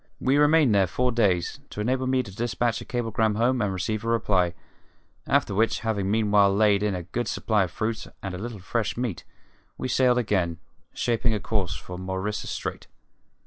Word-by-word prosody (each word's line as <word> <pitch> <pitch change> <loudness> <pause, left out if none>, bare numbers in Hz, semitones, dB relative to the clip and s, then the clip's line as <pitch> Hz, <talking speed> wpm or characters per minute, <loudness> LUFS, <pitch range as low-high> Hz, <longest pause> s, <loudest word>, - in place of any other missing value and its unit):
We 135 +2 +2
remained 150 -4 +5
there 100 -2 +4
four 125 +9 0
days, 100 -7 +1
to - - -8
enable 130 +4 0
me 130 0 +2
to 95 -4 -11
dispatch 120 0 -1
a - - -8
cablegram 115 -3 0
home 120 +3 +2
and 105 -2 0
receive 105 +4 -2
a - - -4
reply; 95 -7 +1 0.7
after - - +2
which, 110 +3 +1
having 105 -4 -1
meanwhile 105 -2 +4
laid 100 0 +3
in 105 -2 0
a 90 - -4
good 110 +7 -3
supply 105 -3 +1
of - - -8
fruit 110 +1 -3 0.2
and 95 -1 -4
a 90 - -5
little 115 +1 -5
fresh 105 +4 -2
meat, 120 -7 -3 0.5
we - - -3
sailed 125 -1 +3
again, 95 -8 0 0.3
shaping 120 -1 0
a - - -1
course 100 -2 -1
for 90 0 -8
Maurissa 95 +3 -3
Strait. - - -5
110 Hz, 185 wpm, -26 LUFS, 95-120 Hz, 0.7 s, remained